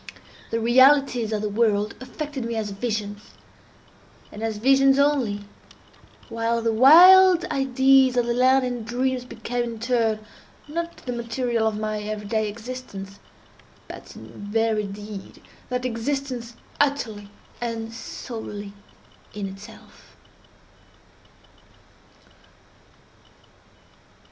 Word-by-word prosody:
The 230 - -1
realities 255 0 +4
of 215 -1 -2
the - - 0
world 210 -1 +1
affected 285 0 -6
me 230 0 -3
as 215 -2 -3
visions, 205 -1 -5 1.0
and 210 - -9
as 225 -1 -2
visions 270 +3 +4
only, 275 -8 +1 0.9
while 230 0 -1
the 230 -1 0
wild 355 +8 +8
ideas 265 -1 +3
of 240 - +3
the 235 - 0
land 255 +2 +3
of 245 -2 -4
dreams 250 +2 -1
became, 240 +1 -4
in 225 - -10
turn, 225 -2 0 0.4
not 335 +3 -5
the 250 - -3
material 235 -1 -1
of 215 -1 -2
my 215 0 -2
every 210 0 -5
day 220 0 -1
existence, 210 -4 -8 0.7
but - - -11
in - - -12 0.2
very 220 -1 0
deed 205 0 -9 0.3
that 250 0 -2
existence 250 0 -3 0.2
utterly 230 -8 -1 0.3
and 230 -1 -4
solely 215 -3 -7 0.6
in 205 -1 -4
itself. 195 +2 -14
230 Hz, 110 wpm, -24 LUFS, 215-260 Hz, 1.0 s, wild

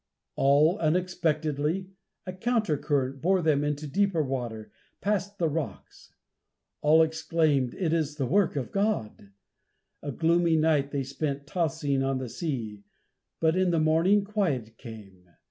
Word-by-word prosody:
All 150 +8 +3
unexpectedly, 160 0 -1 0.3
a 185 - -5
counter 220 -4 0
current 135 -2 -1
bore 185 +1 +2
them 150 -2 +2
into 150 +1 -2
deeper 185 +1 +1
water, 120 -6 -5 0.3
past 205 0 -2
the 170 - +1
rocks. 155 0 -6 0.7
All 155 +2 +5
exclaimed, 160 -5 0
"It 170 -5 -1
is 155 -3 -1
the 140 -3 -1
work 190 +6 +2
of 135 -3 -3
God!" 195 - -2 0.7
A 145 - -4
gloomy 165 +2 +2
night 155 -3 +2
they 140 -1 -2
spent 140 +1 -4
tossing 155 -4 -1
on 135 0 0
the 130 -2 -5
sea, 115 - -4 0.6
but 160 0 +2
in 185 -1 +2
the 170 -2 +2
morning 165 +6 +3
quiet 155 - -2
came. 100 -7 -12
155 Hz, 140 wpm, -27 LUFS, 135-175 Hz, 0.7 s, All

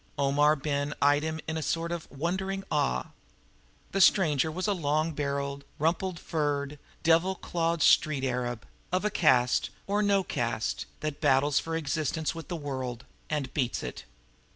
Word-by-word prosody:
Omar 145 +2 +4
Ben 145 0 -2
eyed 145 +1 +4
him 160 +1 -3
in 160 0 -2
a - - -2
sort 165 +4 -1
of 170 -2 -5
wondering 190 +6 -2
awe. 65 - 0 0.8
The 195 - +1
stranger 160 -6 +4
was 185 +5 -2
a 205 - +2
long 155 -2 0
barreled, 140 -1 -3
rumple 170 +4 0
furred, 145 -3 -2 0.2
devil 165 +4 +4
clawed 170 -2 -1
street 145 -4 +4
arab, 120 -2 -2 0.3
of 185 +3 0
a 210 - +1
caste 125 -8 +3 0.2
or 205 +1 +1
no 200 -2 +3
caste - - -2
that 155 -1 -4
battles 135 +1 +4
for 165 0 -4
existence 155 0 -1
with 165 -3 -8
the 175 - -3
world 130 -5 -4 0.2
and 145 -4 -2
beats 130 -5 -1
it. - - -6
150 Hz, 155 wpm, -29 LUFS, 140-170 Hz, 0.8 s, Omar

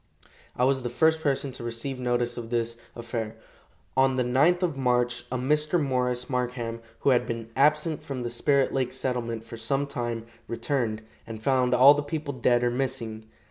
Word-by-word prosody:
I 125 - 0
was 135 0 +2
the 120 - -3
first 160 +6 +2
person 140 -2 0
to 125 - -6
receive 120 +3 -3
notice 120 -1 0
of 115 -1 -6
this 115 -1 -1 0.2
affair. 115 -2 -4 0.6
On 130 0 +3
the 130 - +1
9th 150 +9 +3
of 170 -5 0
March 125 -2 +1
a 130 - 0
Mr. 150 +6 +1
Morris 125 -3 0
Markham, 125 -2 -2 0.2
who 140 - +4
had 125 -1 +2
been 115 -1 -5
absent 150 +1 +2
from 130 -3 -5
the 120 - -3
Spirit 135 +3 +2
lake 130 -2 0
settlement 120 -3 -3
for 115 - -9
some 135 +5 0
time, 120 -4 -4 0.2
returned, 115 -2 -1 0.2
and 110 -1 -8
found 130 -1 +3
all 130 +3 +9
the 145 - -1
people 145 -1 -4
dead 120 -1 +2
or 120 - +2
missing. 120 -4 -3
125 Hz, 180 wpm, -27 LUFS, 120-135 Hz, 0.6 s, all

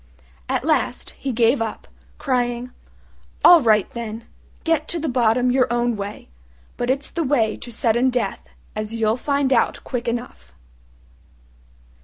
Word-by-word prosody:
At - - 0
last 60 - 0
he 275 - -5
gave 235 +2 +2
up, 225 -1 -4 0.3
crying, 245 -2 -1 0.7
"All 345 -2 +9
right, 215 -5 +3
then, 230 -1 -6 0.4
get 320 -2 +1
to 340 - -2
the 320 - -2
bottom 245 -1 +2
your 255 -1 +2
own 240 -1 +1
way; 205 0 -7 0.5
but 245 - -3
it's 275 +2 0
the 335 - -1
way 245 -7 +1
to 240 - -9
sudden 235 +2 +2
death, 245 -6 -3 0.3
as 215 +1 -4
you'll 220 -1 +1
find 280 +1 0
out - - +1
quick 245 -1 -4
enough." 235 - -5
240 Hz, 145 wpm, -22 LUFS, 225-260 Hz, 0.7 s, All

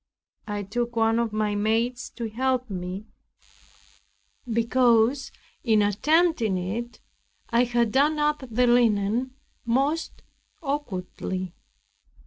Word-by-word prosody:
I 205 -1 -3
took 235 +4 -3
one 225 0 +3
of 235 -2 0
my 215 -1 0
maids 225 +4 0
to 235 -2 -3
help 255 +1 -1
me, 185 +2 -5 1.5
because 235 +2 +3 0.3
in 220 -4 +3
attempting 235 - +2
it 225 +7 -4 0.5
I 235 +1 +4
had 240 -2 +1
done 290 +5 +3
up 300 0 +1
the 245 +2 +2
linen 240 +1 +2 0.3
most 275 +7 -1 0.4
awkwardly. 185 - -4
235 Hz, 105 wpm, -25 LUFS, 210-255 Hz, 1.5 s, I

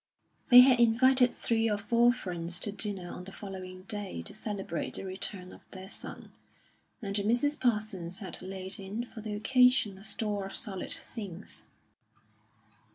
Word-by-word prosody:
They 245 0 +12
had 250 -1 +6
invited 250 +2 +5
three 225 -1 +1
or 210 - +1
four 235 +4 +4
friends 175 -7 -4
to 205 - -2
dinner 200 -3 -4
on 180 - -8
the 195 - -9
following 185 -2 -8
day 205 -2 -5
to 205 - -7
celebrate 205 -5 -4
the - - -5
return 185 0 -6
of - - -14
their 190 0 -9
son, - - -9 0.7
and 200 -1 -3
Mrs. 240 +8 +1
Parsons 210 -7 0
had 195 -4 -7
laid 190 +1 -6
in 205 +5 -4
for 225 - -10
the 210 -1 -4
occasion 250 -3 +4
a - - -13
store 205 -1 -2
of 195 - -8
solid 195 -5 -2
things. 200 -4 -6
205 Hz, 160 wpm, -30 LUFS, 190-230 Hz, 0.7 s, They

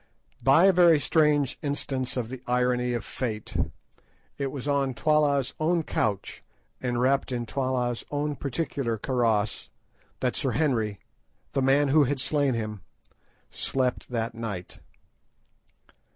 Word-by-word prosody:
By 140 +7 +6
a 195 - +6
very 170 -3 +6
strange 145 -3 +2
instance 135 -3 -3
of 120 -2 -2
the 130 -1 -7
irony 125 0 +1
of 120 -4 -3
fate, 110 -5 -4 0.8
it 140 - 0
was 140 -1 -6
on 140 -3 +1
Twala's 145 -3 +2
own 165 +2 +2
couch, 105 -8 -2 0.4
and 125 -2 -1
wrapped 135 +2 +2
in 120 -1 -2
Twala's 125 -2 -1
own 145 0 -1
particular 135 -4 -2
karross, 115 -3 0 0.5
that - - 0
Sir - - -1
Henry, 115 -10 0 0.5
the 135 - +1
man 135 +2 +3
who 150 +1 +5
had 135 +1 -1
slain 140 -2 +1
him, 110 -3 -4 0.7
slept 130 -2 -1
that 115 -1 -2
night. 105 -6 -6
130 Hz, 130 wpm, -27 LUFS, 120-145 Hz, 0.8 s, By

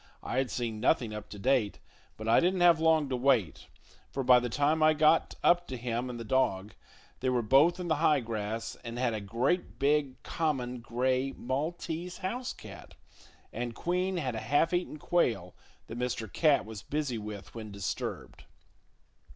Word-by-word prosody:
I 130 - -1
had 135 -2 0
seen 115 -3 -3
nothing 120 -2 +1
up 105 0 -7
to 105 - -9
date, 120 -1 +1 0.4
but 110 - -6
I 115 - +6
didn't 180 +1 +1
have 170 -2 +6
long 160 -2 +3
to 130 - -1
wait, 125 - +1 0.4
for 135 - -3
by 125 0 +7
the 125 0 -3
time 145 +5 +1
I 155 0 +5
got 155 +2 +3
up 175 0 +4
to 130 - -5
him 120 +1 -3
and 120 -1 -6
the - - -5
dog, 105 -5 0 0.5
they 130 - 0
were 125 -2 +1
both 145 - +4
in 180 - -4
the 160 -2 +1
high 150 -2 +3
grass 110 -1 -4
and 115 0 -6
had 125 -2 0
a 110 - -3
great, 120 - -1
big, 140 -1 +1
common 130 -6 -2
gray 130 +3 -1
maltese 160 +6 -3
house 245 +7 -3
cat; - - -12 0.6
and 120 0 -4
Queen 180 +2 -1
had 130 -7 -2
a 110 - -3
half 145 +10 +1
eaten 175 -3 -1
quail 115 - 0 0.3
that 115 - -7
Mr. 125 -4 -3
Cat 150 -4 +3
was 110 -2 -8
busy 140 -4 -2
with 105 -2 -8
when 110 -2 -7
disturbed. 100 -1 -5
130 Hz, 180 wpm, -30 LUFS, 115-155 Hz, 0.6 s, by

